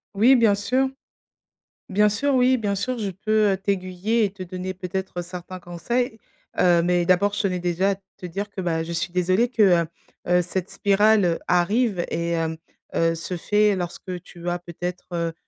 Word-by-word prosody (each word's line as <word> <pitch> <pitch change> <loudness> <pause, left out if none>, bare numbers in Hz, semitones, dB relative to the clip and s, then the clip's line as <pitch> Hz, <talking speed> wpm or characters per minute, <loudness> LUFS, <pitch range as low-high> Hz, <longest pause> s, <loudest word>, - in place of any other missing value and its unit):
Oui, 240 +7 +6
bien 225 -5 +4
sûr. 255 +7 +1 1.0
Bien 210 +2 +4
sûr, 270 +7 0
oui, 255 0 +4
bien 205 -4 -1
sûr, 250 +6 -2
je 205 -3 -2
peux, 215 +3 +1
heu, 190 - +1
t'aiguiller 195 +3 0
et 200 - -1
te 190 -2 -8
donner 185 +1 -5
peut-être 185 0 -4
certains 180 +1 -8
conseils. 220 +8 -2 0.4
Heu, 175 -2 +5
mais 175 0 +2
d'abord 185 +3 +3
je 205 - -1
tenais 185 -2 0
déjà 180 +3 +1
à - - -1 0.2
te 185 -2 -7
dire 200 +5 -4
que, 200 - -6
bah, 165 -3 0
je 170 - -6
suis 170 +1 -2
désolée 185 +6 +2
que, 235 -3 +1 0.2
heu - - -4 0.4
heu, 180 0 +4
cette 185 +1 -4
spirale 200 -3 +3
arrive 190 +2 +2
et 170 0 -2
hem, 160 -1 -1 0.4
heu, 165 0 +2
se 170 +2 -5
fait 210 +4 +2
lorsque 180 0 -5
tu 175 -1 -9
as 175 - 0
peut-être, 175 +1 -6
heu, 170 -1 -1
185 Hz, 185 wpm, -23 LUFS, 175-210 Hz, 1.0 s, Oui